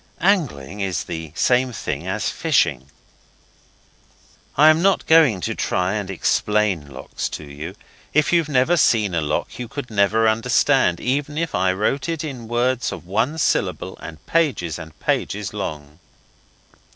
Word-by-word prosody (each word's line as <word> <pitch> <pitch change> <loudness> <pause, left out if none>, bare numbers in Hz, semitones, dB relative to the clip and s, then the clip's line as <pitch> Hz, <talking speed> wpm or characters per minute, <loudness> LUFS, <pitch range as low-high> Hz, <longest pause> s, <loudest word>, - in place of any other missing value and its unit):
Angling 140 - 0
is 95 -4 -1
the 80 -2 -6
same 125 +4 +2
thing - - -4
as - - -1
fishing. 65 +3 +1 1.7
I 155 +3 +8
am 160 +1 +1
not 195 +1 +2
going 155 - +5
to - - -2
try 90 +2 -1
and 105 -3 -3
explain 95 -3 0
locks 65 - -5
to - - -7
you. 75 +2 -8 0.4
If 155 +2 +2
you've 165 -3 +2
never 145 +5 +3
seen 110 - +3
a 85 - +1
lock 75 +9 -3
you 125 - -4
could 125 0 -7
never 110 +2 +3
understand 115 -3 +2
even 145 +3 -2
if 165 -2 -2
I 95 +1 +2
wrote 135 - -1
it 165 -1 -2
in 130 -7 -6
words 120 +2 0
of - - -8
one 110 - 0
syllable - - 0
and 80 - -10
pages 120 - 0
and 80 -1 -11
pages 100 -1 -2
long. 75 -6 -6
110 Hz, 150 wpm, -21 LUFS, 90-145 Hz, 1.7 s, I